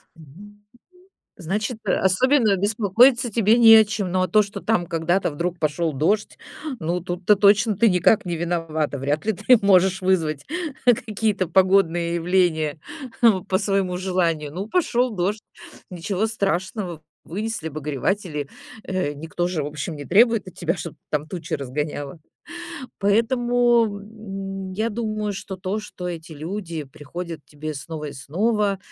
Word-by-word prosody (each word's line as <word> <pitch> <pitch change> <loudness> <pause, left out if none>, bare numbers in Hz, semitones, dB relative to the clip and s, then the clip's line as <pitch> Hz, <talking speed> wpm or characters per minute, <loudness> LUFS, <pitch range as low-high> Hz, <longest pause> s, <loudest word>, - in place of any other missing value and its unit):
Мгм, 160 -3 -15
м. 205 0 -14 0.8
Значит, 205 +6 -3
э, 185 - +1
особенно 215 +3 +3
беспокоиться 225 +5 +3
тебе 225 +1 +3
не 230 -2 +9
о 220 -1 +7
чем. 205 -4 -3
Но 185 0 +1
а 185 - 0
то, 215 0 +4
что 200 0 -7
там 215 -6 +1
когда-то 170 +2 0
вдруг 170 +4 -3
пошёл 155 +1 0
дождь, 200 +10 0 0.4
ну, 170 +2 -1
тут-то 180 +3 +1
точно 205 +2 +4
ты 230 -2 +5
никак 180 +3 +3
не 175 -1 -2
виновата. 160 -4 -2
Вряд 145 +7 -1
ли 220 - +1
ты 250 +7 +4
можешь 190 -1 +4
вызвать 160 -6 0 0.4
какие-то 215 -5 +1
погодные 175 -2 +3
явления 170 -4 +1 0.7
по 185 - +3
своему 195 -2 0
желанию. 170 -5 -1
Ну, 195 +4 -4
пошёл 255 -6 +1
дождь, 200 +4 -1 0.5
ничего 190 +4 -2
страшного, 190 -4 -2 0.2
вынесли 210 -1 -4
обогреватели. 150 - -3 0.3
Э, 185 -6 -2
никто 165 +4 -3
же, 170 -4 -2
в - - -3
общем, 150 +2 -5
не 145 -1 -8
требует 225 -2 +4
от 185 - -11
тебя, 170 +1 -1
чтоб 165 -1 -7 0.2
там 150 0 -1
тучи 170 -3 -6
разгоняла. 145 +2 -4 0.8
Поэтому, 240 +2 +3
м, 195 -2 -7
я 220 +4 -1
думаю, 215 -2 -2
что 190 0 -7
то, 190 +3 -3
что 180 -4 -7
эти 165 -1 -7
люди 165 +1 -5
приходят 160 +5 -8
к - - -47
тебе 155 +1 -6
снова 150 +2 -6
и 145 - -6
снова, 200 - 0
185 Hz, 150 wpm, -23 LUFS, 160-210 Hz, 0.8 s, не